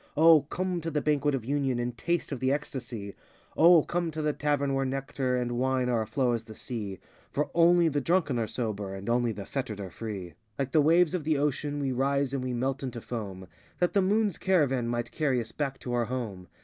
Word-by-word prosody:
O, 160 0 +7
come 180 +4 -3
to 165 - -3
the 150 -2 0
Banquet 145 -1 +1
of 120 -4 -4
Union 135 -2 0
And 120 0 -2
taste 170 +8 -1
of 135 - -3
the 130 +1 +1
ecstasy. 120 -8 -4 0.4
O, 170 -1 +7
come 175 -1 -1
to 155 0 -4
the 150 0 +1
Tavern 145 -2 0
where 135 0 +1
nectar 135 -1 -1
82 - - 0
And 120 0 -3
wine 130 -1 +1
are 120 -2 +2
a 110 - -4
flow 125 +2 +1
as 115 -1 0
the 110 -1 -11
sea. 105 -7 -5 0.3
For 150 - -2
only 170 0 +5
the 145 -2 0
drunken 160 -5 +1
are 110 - -1
sober, 105 -5 -3
And 95 +1 -8
only 120 0 +2
the 100 -2 -6
fettered 115 -7 -4
are 95 -2 -6
free. 95 -3 -6 0.2
Like 135 -1 -2
the 155 - +5
waves 170 +3 +4
of 180 -4 -1
the 155 0 +1
ocean 145 0 -1
we 135 -2 -1
rise 135 +1 0
and 135 -2 -1
we 130 - -2
melt 130 +3 -1
into 125 -3 -4
foam 100 -6 -6 0.3
That 180 - +1
the 200 - +4
Moon's 205 0 +1
caravan 140 -10 +2
might 120 0 -2
carry 140 -5 +1
us 115 -1 -5
back 140 -3 -3
to 125 - -4
our 120 -1 +1
home. 110 -7 -5
135 Hz, 230 wpm, -28 LUFS, 120-150 Hz, 0.4 s, O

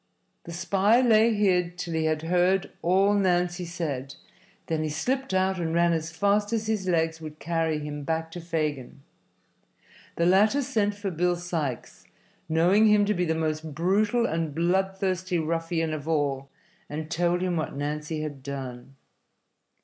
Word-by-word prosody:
The 170 - -8
spy 195 +6 +2
lay 230 -2 +5
hid 180 -4 +1
till 175 -2 -4
he 160 0 0
had 155 0 0
heard 180 +3 +2
all 195 +4 +3
Nancy 180 -2 +1
said; 145 -6 -4 0.5
then 160 -1 -1
he 155 - -1
slipped 255 - -2
out 190 0 +1
and 165 -1 -1
ran 170 0 +3
as 160 0 -2
fast 205 +5 +1
as 220 -1 0
his 215 -3 -1
legs 165 -2 0
would 155 -1 -8
carry 165 -2 -1
him 150 0 -5
back 160 +2 -2
to 175 - -7
Fagin. 150 -5 -3 1.1
The 170 - +1
latter 210 +10 +4
sent 215 -6 0
for 200 -1 -4
Bill 175 +1 +1
Sikes, 165 -8 -4 0.4
knowing 180 +7 +4
him 210 -1 +5
to 210 - +1
be 180 -2 0
the 160 -1 0
most 155 -1 -3
brutal 205 +8 +2
and 160 -6 -2
bloodthirsty 185 +1 0
ruffian 165 0 -1
of 155 0 -6
all, 140 -4 -1 0.4
and 155 +2 -5
told 175 +1 +1
him 180 -1 0
what 155 -3 -3
Nancy 150 +2 -3
had 145 -3 -6
done. 135 -1 -7
170 Hz, 160 wpm, -26 LUFS, 155-190 Hz, 1.1 s, lay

